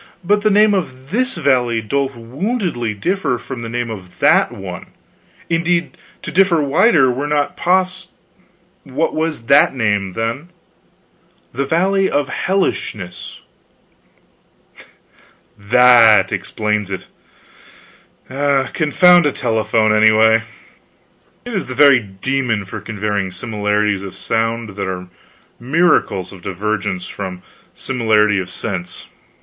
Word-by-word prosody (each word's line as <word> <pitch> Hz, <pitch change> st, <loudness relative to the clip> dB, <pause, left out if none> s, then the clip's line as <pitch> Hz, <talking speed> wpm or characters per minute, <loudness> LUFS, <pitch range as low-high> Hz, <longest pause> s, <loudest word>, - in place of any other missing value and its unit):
But 205 Hz, +4 st, +2 dB
the 215 Hz, -, +2 dB
name 210 Hz, +1 st, +4 dB
of 135 Hz, -7 st, -4 dB
this 255 Hz, +5 st, 0 dB
valley 130 Hz, -7 st, +1 dB
doth 135 Hz, +4 st, -2 dB
woundily 125 Hz, -, -3 dB
differ 170 Hz, -, -1 dB
from 125 Hz, +1 st, -8 dB
the 115 Hz, -, -6 dB
name 120 Hz, 0 st, -3 dB
of 95 Hz, -4 st, -10 dB
that -, -, +3 dB
one; -, -, -8 dB, 0.6 s
indeed 170 Hz, +1 st, 0 dB, 0.3 s
to -, -, -5 dB
differ 180 Hz, -1 st, +3 dB
wider 145 Hz, -, +3 dB
were 135 Hz, +4 st, -3 dB
not 145 Hz, -1 st, -1 dB
pos 185 Hz, +1 st, 0 dB, 0.4 s
" 180 Hz, +1 st, -38 dB
"What 140 Hz, +5 st, -2 dB
was 160 Hz, -4 st, -2 dB
that 140 Hz, +1 st, +4 dB
name, 105 Hz, -5 st, -1 dB
then?" 115 Hz, -, -4 dB, 1.0 s
"The 140 Hz, +3 st, -2 dB
Valley 190 Hz, +6 st, +1 dB
of 145 Hz, -2 st, -1 dB
Hellishness." 105 Hz, -, -3 dB, 2.1 s
"That 115 Hz, +1 st, +5 dB
explains 105 Hz, -2 st, -2 dB
it. 95 Hz, -, -6 dB, 1.2 s
Confound 145 Hz, +5 st, +3 dB
a -, -, +1 dB
telephone, 110 Hz, -3 st, 0 dB
anyway. 110 Hz, +1 st, +5 dB, 1.0 s
It 245 Hz, -, -6 dB
is 195 Hz, -, -2 dB
the 130 Hz, -, -6 dB
very 140 Hz, -2 st, +6 dB
demon 115 Hz, +2 st, -2 dB
for 95 Hz, -, -8 dB
conveying 105 Hz, -3 st, -3 dB
similarities 105 Hz, -1 st, -1 dB
of 100 Hz, -1 st, -8 dB
sound 115 Hz, 0 st, -2 dB
that 100 Hz, -1 st, -5 dB
are 90 Hz, -1 st, -6 dB, 0.5 s
miracles 130 Hz, -, +1 dB
of 95 Hz, -3 st, -13 dB
divergence 100 Hz, 0 st, -3 dB
from 90 Hz, -1 st, -7 dB, 0.3 s
similarity 110 Hz, -5 st, +1 dB
of 90 Hz, -1 st, -5 dB
sense. 95 Hz, -5 st, -5 dB
125 Hz, 120 wpm, -17 LUFS, 105-165 Hz, 2.1 s, very